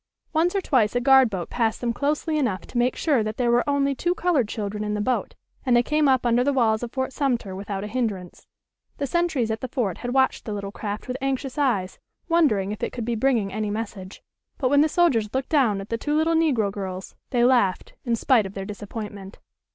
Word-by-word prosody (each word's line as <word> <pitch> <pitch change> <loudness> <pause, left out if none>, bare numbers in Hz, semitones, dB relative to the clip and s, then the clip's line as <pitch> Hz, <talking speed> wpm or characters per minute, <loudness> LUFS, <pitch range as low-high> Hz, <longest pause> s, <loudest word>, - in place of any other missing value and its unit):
Once 340 +4 +2
or 395 - +1
twice 245 - +2
a - - +3
guard 265 -1 +6
boat 185 -4 -5
passed 225 -2 0
them 235 -1 -1
closely 300 +4 -1
enough 215 -9 0
to 240 - -4
make 245 +1 +2
sure 285 -8 +2
that 215 0 -3
there 240 -2 +2
were 240 0 +3
only 280 -1 +2
two 350 +6 -1
colored 330 - +1
children 210 -1 -4
in 210 0 -2
the - - -2
boat, 250 +5 -1 0.3
and 250 -3 +3
they 240 - +5
came 300 +2 +2
up 260 -2 +3
under 240 +1 +3
the 285 - +2
walls 225 -5 +2
of 240 -1 -5
Fort 260 0 -3
Sumter 240 -9 -1
without 195 0 -5
a - - -4
hindrance. 210 -6 -4 0.5
The 285 - -1
sentries 300 -7 0
at 220 0 -3
the 255 - -3
fort 230 - -2
had 245 - -4
watched 265 0 +1
the 215 - -4
little 200 -1 -5
craft 205 +2 -5
with 255 0 -3
anxious 270 -1 -2
eyes, 235 -11 0 0.3
wondering 250 - +2
if 210 - -6
it - - -2
could 235 -3 -4
be 240 - -1
bringing 225 -4 +1
any 215 0 -2
message. 205 -3 -6 0.3
But 255 - +1
when 285 0 +5
the 310 - +3
soldiers 270 -12 +2
looked 265 -1 -1
down 255 -10 +2
at 195 - -8
the 230 - -2
two 295 +3 -1
little 320 +2 +2
negro 275 -11 +2
girls 190 -2 -6 0.2
they 240 -2 +2
laughed, 240 -7 +2
in 235 -2 0
spite 230 -3 +3
of 195 - -12
their 195 -1 -4
disappointment. 205 -1 -7
240 Hz, 230 wpm, -24 LUFS, 210-270 Hz, 0.5 s, guard